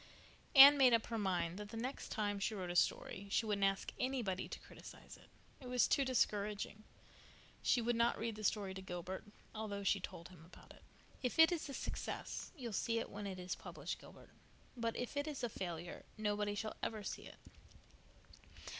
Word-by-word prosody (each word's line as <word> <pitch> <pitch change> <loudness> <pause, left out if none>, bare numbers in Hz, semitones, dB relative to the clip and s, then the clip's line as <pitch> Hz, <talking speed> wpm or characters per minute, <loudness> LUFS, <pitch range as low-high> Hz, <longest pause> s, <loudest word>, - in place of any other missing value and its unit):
Anne 280 +1 +12
made 255 -3 +7
up 225 - 0
her 230 - -3
mind 180 -2 0
that 210 -1 -6
the 225 - -7
next 255 +4 -4
time 205 -2 -1
she 215 +2 -1
wrote 180 -3 -3
a - - -5
story 195 +2 +1
she 225 - +2
wouldn't 205 -2 0
ask 195 0 +1
anybody 240 -8 -1
to - - -6
criticize - - -12
it. - - -19 0.3
It 250 - -7
was 250 -1 +4
too 280 - +3
discouraging. 210 -4 0 0.8
She 245 - +3
would 240 +1 +1
not 235 +1 +3
read 225 0 -2
the 215 - -8
story 200 -2 0
to 190 - -7
Gilbert, 185 0 -5 0.3
although 210 -2 -4
she 200 0 +3
told 170 -2 -7
him 175 -4 -14
about 170 - -15
it. - - -16 0.4
"If 250 +3 -1
it 320 +1 +8
is 330 -4 -2
a 275 - -5
success - - -4
you'll 240 -5 -5
see 230 +3 0
it 230 - -3
when 205 0 -5
it 190 -1 -5
is 180 0 -3
published, - - -6
Gilbert, - - -14 0.4
but 230 -1 -2
if 245 +3 -4
it 285 +1 -1
is 295 -4 -4
a 240 - 0
failure 175 -4 -5
nobody 210 -1 0
shall 215 +1 -3
ever 215 -2 -3
see - - -5
it." - - -13
210 Hz, 200 wpm, -37 LUFS, 195-240 Hz, 0.8 s, Anne